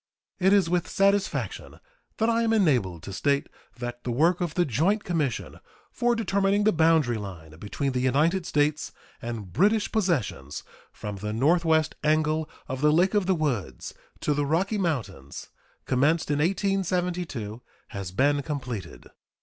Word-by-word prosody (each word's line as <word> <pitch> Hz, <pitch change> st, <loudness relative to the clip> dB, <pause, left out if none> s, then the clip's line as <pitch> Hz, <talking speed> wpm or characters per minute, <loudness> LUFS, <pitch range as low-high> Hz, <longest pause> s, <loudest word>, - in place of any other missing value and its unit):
It 190 Hz, +1 st, +4 dB
is 200 Hz, -4 st, +4 dB
with 175 Hz, 0 st, 0 dB
satisfaction 200 Hz, 0 st, 0 dB, 0.4 s
that 225 Hz, -, +1 dB
I 230 Hz, 0 st, +2 dB
am 225 Hz, -1 st, +2 dB
enabled 125 Hz, -, +1 dB
to 95 Hz, -, -7 dB
state 140 Hz, +7 st, 0 dB, 0.3 s
that 120 Hz, 0 st, -6 dB
the -, -, -4 dB
work 165 Hz, +9 st, +2 dB
of 170 Hz, -3 st, -2 dB
the 175 Hz, -, +3 dB
joint 165 Hz, -, +1 dB
commission 155 Hz, -9 st, -2 dB, 0.3 s
for 240 Hz, 0 st, +1 dB
determining 200 Hz, -2 st, +1 dB
the 215 Hz, -, +4 dB
boundary 160 Hz, -, +3 dB
line 85 Hz, -6 st, -9 dB
between 135 Hz, +8 st, -2 dB
the 130 Hz, -, -1 dB
United 155 Hz, +8 st, +1 dB
States 150 Hz, 0 st, 0 dB, 0.3 s
and 110 Hz, -6 st, -6 dB
British 210 Hz, +5 st, +2 dB
possessions 130 Hz, -, -1 dB, 0.3 s
from 105 Hz, -1 st, -7 dB
the 105 Hz, +2 st, -4 dB
northwest 160 Hz, +5 st, +2 dB
angle 155 Hz, 0 st, +1 dB, 0.2 s
of 130 Hz, 0 st, -4 dB
the 150 Hz, 0 st, +5 dB
Lake 180 Hz, +6 st, +3 dB
of 205 Hz, -3 st, +1 dB
the 190 Hz, -, +3 dB
Woods 120 Hz, -, -3 dB, 0.3 s
to 150 Hz, -, +1 dB
the 145 Hz, 0 st, 0 dB
Rocky 190 Hz, +8 st, 0 dB
Mountains, 125 Hz, -, -4 dB, 0.4 s
commenced 150 Hz, +5 st, +1 dB
in 145 Hz, -, +1 dB
1872, 180 Hz, -, -1 dB, 0.3 s
has 100 Hz, -2 st, -5 dB
been 140 Hz, +8 st, +2 dB
completed. 125 Hz, -, -6 dB
155 Hz, 150 wpm, -26 LUFS, 120-185 Hz, 0.4 s, the